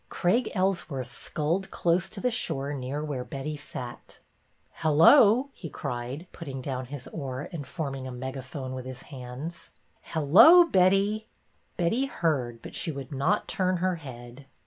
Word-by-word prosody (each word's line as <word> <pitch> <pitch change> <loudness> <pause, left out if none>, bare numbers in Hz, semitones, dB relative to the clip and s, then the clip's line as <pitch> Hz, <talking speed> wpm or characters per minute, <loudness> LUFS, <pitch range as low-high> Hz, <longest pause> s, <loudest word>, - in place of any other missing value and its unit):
Craig 220 +7 +1
Ellsworth 155 -9 -1
sculled 170 +7 -2
close 175 +2 +1
to 200 - -8
the 250 +4 +1
shore 140 - -1
near 140 +2 -4
where 140 -4 -3
Betty 140 +3 -5
sat. 125 -4 -8 0.6
Hello! 210 - +6
" - - -40
he 165 - -8
cried, 130 +3 -5
putting 140 -6 -7
down 130 -1 -4
his 140 -1 -7
oar 135 -3 -5
and 150 -6 -6
forming 135 -3 -4
a - - -6
megaphone 130 +1 -6
with 130 -1 -6
his 130 -1 -8
hands. 135 +6 -8 0.3
Hello, 205 - +7
Betty!" 200 - +2 0.5
Betty 225 +10 +1
heard, 130 - -1
but - - -9
she 165 - -2
would 140 -2 -7
not 140 +9 +1
turn 185 -1 +1
her 180 0 0
head. 125 -2 -10
145 Hz, 150 wpm, -27 LUFS, 130-185 Hz, 0.6 s, Hello